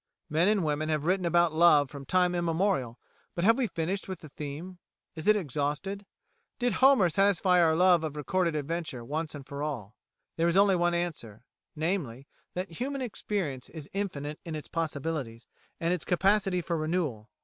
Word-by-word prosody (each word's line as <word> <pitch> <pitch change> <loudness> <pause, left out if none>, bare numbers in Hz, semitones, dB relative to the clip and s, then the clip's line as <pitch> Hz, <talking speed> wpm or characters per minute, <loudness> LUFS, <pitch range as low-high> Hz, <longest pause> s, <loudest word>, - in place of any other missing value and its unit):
Men 165 +4 +3
and 210 -3 +3
women 155 0 -1
have 155 -1 0
written 185 0 +1
about 170 -1 +3
love 155 -4 +5
from 140 -2 -9
time 180 -1 +3
immemorial, 170 - 0 0.4
but 170 - -1
have 225 +4 +6
we 260 -2 0
finished 185 +2 -3
with 190 -3 -6
the 155 - -11
theme? 155 +6 -7 0.3
Is 160 +1 -7
it 215 - +7
exhausted? 170 +4 -3 0.5
Did 245 0 0
Homer 265 -8 +5
satisfy 185 0 +3
our 160 -2 +4
love 180 -1 +5
of 155 -2 -4
recorded 170 +3 0
adventure 150 -5 -3
once 155 +4 -3
and 140 -2 -9
for 140 +1 -6
all? 125 -9 -4 0.4
There 165 +1 +2
is 170 +2 +2
only 200 -1 +5
one 175 0 +2
answer 125 -10 -4 0.3
namely, 155 -6 -2 0.3
that 180 -2 -5
human 270 +1 -2
experience 190 - -3
is 155 -4 -9
infinite 155 -7 -3
in 165 -3 -5
its 150 - -6
possibilities 145 -7 -3 0.3
and 170 +1 +1
its 180 - -2
capacity 195 0 +2
for 170 0 -2
renewal. 155 -9 -2
165 Hz, 175 wpm, -29 LUFS, 150-185 Hz, 0.5 s, it